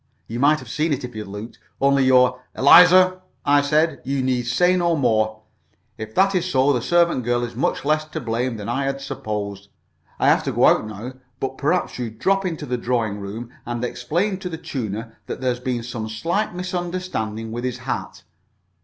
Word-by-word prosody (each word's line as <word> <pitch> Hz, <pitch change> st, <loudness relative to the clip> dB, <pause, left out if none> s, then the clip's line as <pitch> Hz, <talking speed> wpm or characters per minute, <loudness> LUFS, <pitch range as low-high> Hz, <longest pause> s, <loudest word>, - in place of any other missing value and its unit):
You 115 Hz, +2 st, -5 dB
might 145 Hz, +3 st, +4 dB
have -, -, -11 dB
seen 155 Hz, 0 st, 0 dB
it 135 Hz, -, -3 dB
if 125 Hz, -, -6 dB
you'd 110 Hz, -2 st, -6 dB
looked. 105 Hz, +4 st, -8 dB, 0.2 s
Only 140 Hz, -1 st, +3 dB
you're 125 Hz, -1 st, +4 dB
" -, -, -43 dB
"Eliza," 185 Hz, +5 st, +7 dB, 0.2 s
I 145 Hz, 0 st, +5 dB
said, 155 Hz, +3 st, +1 dB
"you 135 Hz, 0 st, -1 dB
need 125 Hz, -2 st, 0 dB
say 180 Hz, +9 st, +3 dB
no 170 Hz, -2 st, +2 dB
more. 110 Hz, -5 st, +1 dB, 0.5 s
If 110 Hz, 0 st, -8 dB
that 195 Hz, +1 st, +4 dB
is 185 Hz, -1 st, 0 dB
so, 135 Hz, -1 st, +3 dB
the 125 Hz, -, 0 dB
servant 170 Hz, -1 st, +2 dB
girl 120 Hz, +1 st, 0 dB
is 120 Hz, -1 st, -5 dB
much 135 Hz, -, -1 dB
less 155 Hz, +1 st, +2 dB
to 155 Hz, -, -6 dB
blame 120 Hz, 0 st, -2 dB
than 105 Hz, -, -7 dB
I 135 Hz, +4 st, -1 dB
had 135 Hz, 0 st, -2 dB
supposed. 105 Hz, -8 st, -5 dB, 0.5 s
I -, -, +1 dB
have -, -, +5 dB
to -, -, 0 dB
go -, -, +4 dB
out -, -, +4 dB
now, 110 Hz, +4 st, -7 dB, 0.3 s
but 135 Hz, 0 st, -3 dB
perhaps 150 Hz, 0 st, 0 dB
you'd 115 Hz, -3 st, -5 dB
drop 195 Hz, -, +1 dB
into 160 Hz, -4 st, -4 dB
the 125 Hz, -2 st, -2 dB
drawing 115 Hz, -4 st, -1 dB
room 110 Hz, +5 st, -7 dB
and 120 Hz, 0 st, -3 dB
explain 175 Hz, -, -1 dB
to 180 Hz, -, -5 dB
the 165 Hz, -, -5 dB
tuner 115 Hz, -6 st, -5 dB
that -, -, -5 dB
there's 125 Hz, -2 st, -1 dB
been 125 Hz, -2 st, -2 dB
some 115 Hz, -2 st, -5 dB
slight 170 Hz, -, -1 dB
misunderstanding 175 Hz, -, -3 dB
with 120 Hz, +2 st, -4 dB
his 125 Hz, -1 st, -2 dB
hat. 130 Hz, +1 st, -5 dB
130 Hz, 200 wpm, -22 LUFS, 115-160 Hz, 0.5 s, Eliza